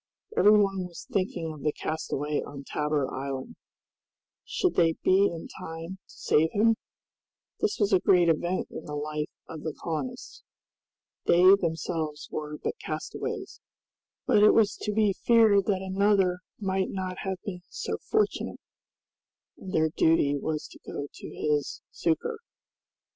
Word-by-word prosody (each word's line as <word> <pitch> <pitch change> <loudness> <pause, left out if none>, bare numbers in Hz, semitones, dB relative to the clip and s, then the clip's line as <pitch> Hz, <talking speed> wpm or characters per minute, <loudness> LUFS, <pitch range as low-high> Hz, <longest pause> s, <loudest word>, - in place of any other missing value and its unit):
Every 210 +1 +7
one 195 -2 +1
was 170 - -11
thinking 180 -5 -1
of 150 - -11
the 150 - +1
castaway 150 -1 -2
on 140 -1 -8
Tabor 150 -1 -1
Island. 135 0 -5 0.9
Should 370 - 0
they 165 -2 +4
be 195 +2 +5
in 165 -1 -6
time 165 +3 -7
to - - -17
save 160 +2 +2
him? 225 +2 +4 0.9
This 425 -1 0
was 205 -1 +2
a 190 - +6
great 175 -1 +4
event 175 +3 0
in - - -7
the 150 - -5
life 150 +1 -3 0.2
of 160 -2 -8
the 155 -1 -4
colonists! 150 -6 -5 0.9
They 180 +3 +7
themselves 160 -4 -1
were 150 0 -4
but 460 - -4
castaways, - - -5 0.7
but 220 -6 +4
it 210 - +7
was 215 -2 +4
to 210 - -3
be 210 -1 +3
feared 220 -3 +4
that 190 -2 +1
another 190 -1 +2 0.2
might 190 -2 0
not 185 -1 -4
have 190 -1 -3
been 180 -3 -5
so - - -4
fortunate, 430 -1 0 1.0
and 190 - -8
their 160 -2 +2
duty 155 -2 +3
was 155 +2 -3
to - - -14
go 145 0 -5
to - - -9
his 150 -2 -1
succor. 410 - -1
175 Hz, 150 wpm, -28 LUFS, 155-200 Hz, 1.0 s, Every